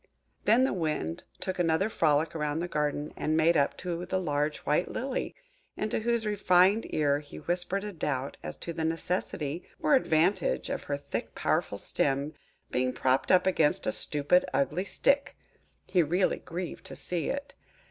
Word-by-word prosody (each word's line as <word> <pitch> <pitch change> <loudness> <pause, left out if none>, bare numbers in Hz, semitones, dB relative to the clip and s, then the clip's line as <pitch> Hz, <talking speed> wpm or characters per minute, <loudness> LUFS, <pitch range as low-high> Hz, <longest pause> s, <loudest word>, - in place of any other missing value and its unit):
Then 230 +5 +5
the 265 - +2
Wind 150 - -2
took 185 -1 -4
another 165 +3 +2
frolic 155 -5 +2
round 150 -1 -1
the 175 - -2
garden, 150 -2 -2
and 155 +1 0
made 165 +2 +4
up 140 -2 +2
to 175 -1 -4
the 185 +1 -1
large 150 -3 0
white 150 +4 +1
Lily, 260 +1 -3 0.4
into 215 - -1
whose 235 0 0
refined 200 0 +3
ear 145 -2 +2
he 145 -1 -11
whispered 180 +3 -1
a 210 -1 -5
doubt 140 -5 -2
as 75 - -5
to 170 - -5
the 160 - -3
necessity 165 -1 -2 0.2
or 300 - +2
advantage 200 - +2
of - - -3
her 140 - -1
thick 140 - -5
powerful - - 0
stem 140 +2 -1 0.4
being 125 0 +1
propped 130 +1 +1
up 185 - +5
against 160 -5 +2
a - - +1
stupid, 150 +9 +2
ugly 155 +7 +1
stick! 280 +6 +1 0.5
He 180 - +3
really 175 +4 +1
grieved 175 +1 -6
to - - -8
see 175 -3 -2
it! 280 0 -4
165 Hz, 170 wpm, -29 LUFS, 150-185 Hz, 0.5 s, Then